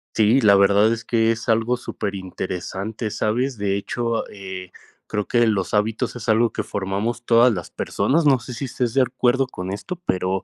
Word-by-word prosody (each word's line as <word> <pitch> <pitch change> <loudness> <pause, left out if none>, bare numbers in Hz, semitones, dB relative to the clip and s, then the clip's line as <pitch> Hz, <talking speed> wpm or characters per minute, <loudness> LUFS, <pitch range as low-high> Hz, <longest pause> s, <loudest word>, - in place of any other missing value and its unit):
Sí, 110 +5 +4
la 100 -2 +6
verdad 100 +3 +5
es 115 -1 -3
que 115 -1 +2
es 115 +1 -4
algo 115 +2 +2
súper 100 -4 -5
interesante, 95 +3 -5
¿sabes? 125 +6 -1
De 100 -1 0
hecho, 115 +3 -2
eh, 95 -2 -8 0.3
creo 105 -2 -3
que 120 -1 +3
los 100 -4 0
hábitos 105 +3 0
es 120 -1 -7
algo 115 +1 +3
que - - -3
formamos 100 +5 -3
todas 120 0 +5
las 90 -3 -5
personas. 160 +3 0
No 135 -3 +5
sé 120 +2 -8
si 125 - -4
estés 125 -1 -2
de 135 - +5
acuerdo 130 +1 +1
con 95 -7 -6
esto, 140 - -5
pero, 95 +1 0
110 Hz, 190 wpm, -22 LUFS, 100-120 Hz, 0.3 s, la